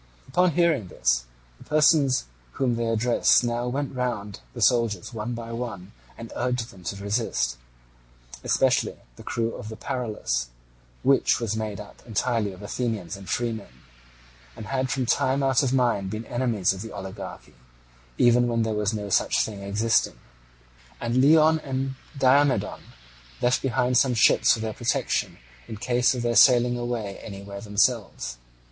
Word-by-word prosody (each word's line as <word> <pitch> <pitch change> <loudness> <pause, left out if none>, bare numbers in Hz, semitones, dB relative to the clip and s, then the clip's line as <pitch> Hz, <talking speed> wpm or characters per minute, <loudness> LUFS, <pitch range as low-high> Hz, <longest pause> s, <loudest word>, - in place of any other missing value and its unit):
Upon 180 +5 +3
hearing 160 - +2
this, - - 0 0.3
the - - -13
persons 150 - +3 0.3
whom 130 -3 0
they 115 0 -1
addressed 115 +2 +3
now 120 0 -1
went 135 +3 -3
round 115 -6 -3 0.2
the - - -6
soldiers 115 -3 +1
one 115 +2 -4
by 115 0 -7
one, 115 -6 -6 0.3
and 115 0 -9
urged 125 -1 -2
them 95 -2 -15
to 100 - -3
resist, 100 - -1 0.9
especially - - +2 0.2
the - - -13
crew 115 0 -2
of 110 - -8
the 110 - -7
Paralus, 105 - -3 0.6
which 135 0 +3
was 110 -2 -2
made 110 -2 -4
up 105 - -11
entirely 115 -1 0
of 95 +2 -12
Athenians 105 -4 -3
and 95 -2 -11
freemen, 110 - -3 0.7
and 110 - -8
had 130 +2 -1
from 130 -1 -1
time 130 +3 +1
out 135 -2 +3
of 135 -3 0
mind 120 -7 +1
been 110 +3 -5
enemies 115 -7 0
of 95 +2 -7
oligarchy, 95 0 -8 0.6
even 120 0 +4
when 115 -1 +1
there 110 -1 -1
was 105 +1 0
no 105 -1 -5
such - - +2
thing 105 -2 -7
existing; 105 - +1 0.8
and 120 +1 -1
Leon 155 +4 +5
and 135 -2 -3 0.2
Diomedon 135 +1 +3 0.6
left 125 +1 +2
behind 125 -1 +2
some 130 -3 +2
ships 110 - +5
for 110 - -3
their 110 -1 -3
protection 120 +2 -1 0.3
in 110 - -7
case 125 +3 +2
of 120 - -3
their 120 0 0
sailing 125 -2 +6
away 120 -5 -4
anywhere 100 -1 -8
themselves. 100 - 0
115 Hz, 155 wpm, -25 LUFS, 105-125 Hz, 0.9 s, sailing